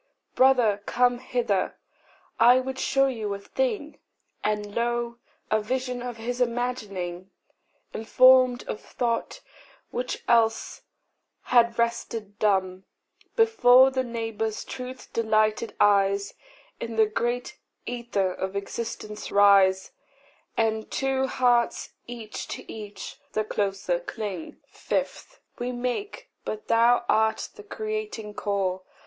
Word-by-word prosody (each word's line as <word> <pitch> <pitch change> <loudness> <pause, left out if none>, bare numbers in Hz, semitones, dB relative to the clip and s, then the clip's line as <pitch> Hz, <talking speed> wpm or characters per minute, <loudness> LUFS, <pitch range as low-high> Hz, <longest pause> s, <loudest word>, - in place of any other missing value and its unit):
Brother, 245 -6 +4
come 245 0 +2
hither 240 -7 -1 0.6
I 245 +3 +7
would 265 0 -4
show 270 0 +3
you 225 -6 -2
a - - -7
thing;" 475 - -2 0.4
And 210 -1 -1
lo, 235 0 -1 0.3
a 215 0 +3
vision 250 +2 -2
of 245 -1 -5
his 245 +2 -4
imagining, 210 -7 -2 0.6
Informed 255 +2 +5
of 210 - -4
thought 240 - -2 0.5
which 250 +1 -3
else 225 -1 +2 0.6
had 235 -2 +3
rested 230 -3 -2
dumb, 190 -3 +1 0.5
Before 270 - +6
the 260 0 0
neighbour's 225 -2 -3
truth 255 0 -8
delighted 215 -1 +1
eyes, 200 -1 +3 0.5
In 230 -1 -5
the 220 0 +5
great 240 +3 -2 0.3
æther 230 -6 -1
of 190 +1 -3
existence 210 +1 -5
rise, 195 -2 +5 0.7
And 220 -1 0
two 265 0 0
hearts 245 -2 +1 0.2
each 235 -3 -7
to - - -7
each 210 -2 -8
the 215 - +1
closer 195 -4 -1
cling! 185 -1 -6
5. - - -4 0.2
We 245 +1 -2
make, 250 - -4 0.2
but 215 0 -6
thou 235 +1 +4
art 220 0 +2
the 425 - -12
creating 430 - -5
core. 195 -3 -1
230 Hz, 115 wpm, -26 LUFS, 210-250 Hz, 0.7 s, I